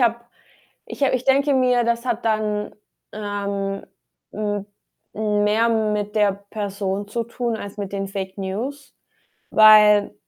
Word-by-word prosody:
habe 235 -1 +2 0.7
ich - - -8
habe 275 - +2
ich 255 0 -1
denke 275 +2 +3
mir, 250 -2 +3
das 235 +1 -1
hat 240 -2 -2
dann, 215 -1 -1 0.4
ähm, 200 -1 -4 0.5
hm, 205 -1 -3 0.5
mehr 210 +1 +1
mit 210 -2 -1
der 205 -2 +3 0.2
Person 200 -1 -3
zu 230 +2 -2
tun 235 0 -3
als 200 -1 -8
mit 200 -1 -5
den 195 -1 -3
Fake 190 0 -6
News, 235 +10 -5 0.6
weil 210 -1 +6
210 Hz, 135 wpm, -22 LUFS, 200-235 Hz, 0.7 s, weil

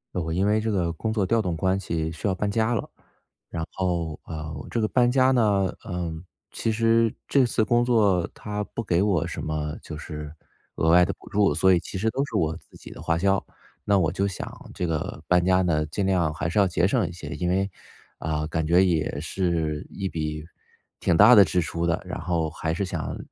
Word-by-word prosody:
我 90 - 0
我 80 0 -3
因 95 +4 +1
为 105 +1 +3
这 110 +1 -2
个 90 -5 0
工 110 +6 -3
作 105 -3 +1
调 115 +4 +2
动 90 -4 -2
关 95 +3 +1
系 80 -4 -2
需 80 - -4
要 95 - +1
搬 100 +2 -1
家 110 +3 +1
了。 110 - -3 0.6
然 80 0 -4
后， 85 -4 -2
呃， 80 -1 -6
这 120 - -1
个 110 - +2
搬 120 +1 +3
家 130 0 +4
呢， 105 -6 +2
嗯， 85 -2 -4 0.3
其 115 - -1
实 115 0 +3
这 135 -2 +4
次 115 -2 +1
工 120 +2 +3
作 105 -8 +2
它 105 0 -4
不 115 - -3
给 90 -3 +1
我 90 -6 +1
什 - - -5
么 75 0 -3
就 80 - -8
是 75 -2 -7 0.4
额 80 - +1
外 90 +2 +7
的 - - -2
补 - - -15
助， 100 -6 +3
所 95 +5 +4
以 90 - +4
其 90 - -7
实 110 +4 +1
都 135 +4 -1
是 140 - -8
我 80 -3 0
自 - - -21
己 - - -12
的 - - -10
花 85 0 0
销。 95 +2 +2 0.4
那 100 -1 +3
我 80 -4 +1
就 100 +4 0
想 95 - -7
这 90 - -2
个 80 -1 -3
搬 90 -1 +4
家 95 +1 +3
呢 80 -4 +1
尽 95 +6 -2
量 90 -5 +1
还 80 0 -3
是 95 - +1
要 100 - +5
节 85 0 +2
省 110 -3 +1
一 85 - -6
些， 80 -4 -8
因 90 0 -1
为， 95 +2 +1 0.5
啊， 75 0 -2
感 80 0 -2
觉 85 +4 +5
也 80 -5 0
是 80 -2 -1
一 95 - -3
笔 75 -1 -4 0.5
挺 85 - +2
大 110 +4 +9
的 105 - +9
支 90 +2 +1
出 85 +1 -2
的。 85 -1 0
然 - - -5
后 80 -1 -1
还 80 +1 -3
是 95 +4 -1
想， 90 -4 -4
90 Hz, 245 characters per minute, -25 LUFS, 80-105 Hz, 0.6 s, 大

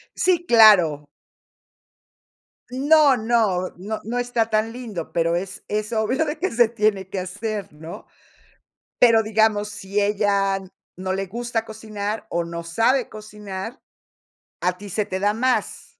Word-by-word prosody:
Sí, 350 -2 +1
claro. 180 -11 +6 1.6
No 285 +2 +4
no 220 -6 +1
no 210 +4 -5
no 240 +3 -3
está 240 -2 0
tan 220 +1 0
lindo, 220 -10 -7
pero 170 0 +1
es 190 +1 -6
es 215 +2 -2
obvio 250 +8 +1
de 300 +1 -3
que 370 +4 -2
se 235 -1 +4
tiene 210 -4 0
que 195 - -3
hacer, 205 +2 -5
¿no? 160 +3 -10 0.9
Pero, 230 -2 +6
digamos, 215 -1 +1
si 200 0 -3
ella 200 -1 +1 0.4
no 185 0 -3
le 195 0 -3
gusta 235 +2 -3
cocinar 215 -1 -5
o 170 0 -1
no 170 0 -6
sabe 230 +10 +1
cocinar, 210 +1 -8 0.8
a 180 +1 0
ti 205 0 -10
se 205 +2 -1
te 185 0 -4
da 205 +1 +1
más. 255 - -1
215 Hz, 145 wpm, -22 LUFS, 190-230 Hz, 1.6 s, claro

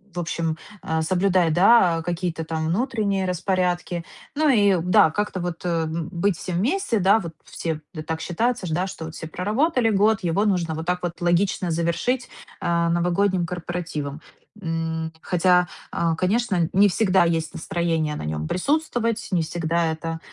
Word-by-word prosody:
в - - -2
общем, 165 -1 -2 0.3
а, 160 0 -1
соблюдать, 180 -1 +2
да, 175 -3 +5
какие-то 175 -1 -2
там 160 -1 -2
внутренние 200 -1 0
распорядки. 180 -1 -1 0.3
Ну, 310 +1 +2
и, 205 -8 +4
да, 170 -2 +5
как-то 205 0 -2
вот 175 0 -5 0.2
быть 170 +3 -1
всем 180 -2 -3
вместе, 245 - +1
да, 195 +4 +5
вот 170 -4 -7
все, 160 -2 -4 0.3
так 160 0 -3
считается 225 +2 -1
ж, - - -4
да, 180 +4 0
что 160 -3 -7
все 160 - -8
проработали 225 - +1
год, 210 +1 +3
его 180 +5 +1
нужно 175 -5 0
вот 160 +1 -5
так 180 0 -1
вот 175 -1 -4
логично 175 +1 +1
завершить, 170 +10 -1 0.3
э, 170 -1 +1
новогодним 175 +1 +1
корпоративом. 165 -5 -4 0.4
М, 165 -1 -2
хотя, 180 0 +3 0.2
э, 165 -1 0
конечно, 185 -2 +1
не 200 +2 +5
всегда 190 -1 +3
есть 165 -2 -1
настроение 165 -3 -1
на - - -5
нём 75 0 -3
присутствовать, 240 - -1
не 175 -3 +2
всегда 165 +1 -1
это, 165 0 -4
175 Hz, 155 wpm, -23 LUFS, 165-200 Hz, 0.4 s, да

